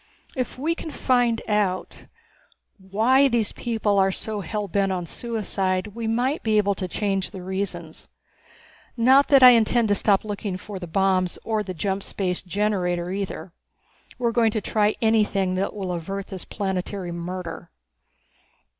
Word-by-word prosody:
If 255 -2 -3
we 310 +6 0
can 330 - -7
find 245 -5 +1
out 205 -3 -1 0.7
why 225 +9 +3
these 235 -5 0
people 220 -4 0
are 190 0 +3
so 215 +2 -4
hell 205 +3 -3
bent 195 +1 0
on 180 -2 -2
suicide 195 -3 -2
we 230 0 -4
might 245 +6 0
be 220 -1 +1
able 200 -1 +3
to 190 -1 -4
change 195 0 -1
the 185 - -9
reasons. 180 -4 -5 0.9
Not 260 +4 +5
that 275 -3 +6
I 250 - +11
intend 230 -1 +3
to - - +4
stop 200 0 +2
looking 205 -2 -4
for 195 +1 -8
the 175 - -7
bombs 185 +1 +1
or 220 -1 0
the 185 -3 -6
jump 195 +3 -2
space 185 -2 -2
generator 180 -3 -1
either. 195 -2 -5 0.6
We 250 - -3
are - - +2
going 230 -1 +3
to 220 - 0
try 210 +1 +1
anything 210 -4 +2
that 190 +3 -2
will 190 -3 -3
avert 195 +3 -4
this 190 -2 -6
planetary 190 -2 -3
murder." 175 +1 -6
200 Hz, 160 wpm, -24 LUFS, 185-225 Hz, 0.9 s, I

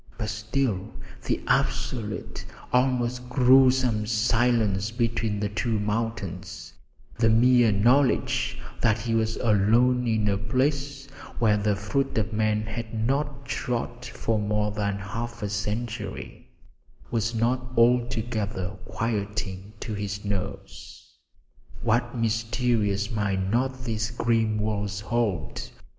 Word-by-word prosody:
But 105 -2 -3
still, 105 -1 -2 0.3
the - - +1
absolute, 110 -5 -1 0.3
almost 125 -1 +1
gruesome 125 -3 +4
silence 110 -3 +2
between 115 -2 -1
the 105 0 -1
two 110 +1 -1
mountains, 105 -4 -3 0.5
the 115 -1 +4
mere 120 0 +5
knowledge 120 +7 +2 0.2
that 110 -1 +3
he 115 +1 -2
was 110 0 +1
alone 120 +4 +3
in 110 -2 +1
a 100 -1 +1
place 135 +5 -1 0.3
where 110 -3 +3
the 105 0 +1
foot 105 +8 -1
of 110 0 0
man 110 0 +1
had 110 +1 -5
not 140 +1 -1
trod 120 -1 -3
for 115 -3 -2
more 105 0 0
than 100 -1 -1
half 115 +3 -5
a 105 - -1
century, 105 +1 -4 0.6
was 115 0 0
not 125 +3 +1
altogether 115 -5 +1
quieting 105 -3 -3
to 110 - -4
his 100 0 -4
nerves. 100 -3 -6 0.7
What 120 +2 +1
mysteries 115 -2 0
might 100 -4 0
not 130 +2 0
these 115 -1 -1
grim 115 -2 +1
walls 105 -1 -2
hold? 105 -8 -1
110 Hz, 115 wpm, -26 LUFS, 105-120 Hz, 0.7 s, mere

